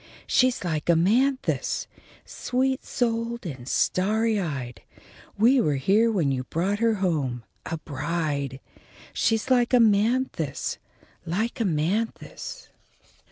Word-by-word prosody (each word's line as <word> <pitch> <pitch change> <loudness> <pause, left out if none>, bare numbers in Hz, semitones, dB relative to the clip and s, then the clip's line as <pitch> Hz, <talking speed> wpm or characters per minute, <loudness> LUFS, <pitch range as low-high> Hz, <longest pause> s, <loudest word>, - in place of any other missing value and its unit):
She's 255 -4 +2
like 160 -2 -2
Amanthis, 235 +11 +2 0.4
sweet 260 +1 -1
souled 235 -1 -2
and 130 -7 -7
starry 215 +3 +1
eyed; 130 - -4 0.6
we 245 +5 +5
were 150 -9 +1
here 205 +12 +3
when 170 -10 +1
you 130 -1 -1
brought 190 +8 -1
her 230 -1 +3
home, 150 - -1 0.2
a 165 - -3
bride. 145 -3 -3 0.5
She's 225 +3 0
like 245 0 +4
Amanthis! 225 - +1 0.4
Like 205 +8 -2
Amanthis!" 205 - -2
200 Hz, 105 wpm, -25 LUFS, 155-230 Hz, 0.6 s, we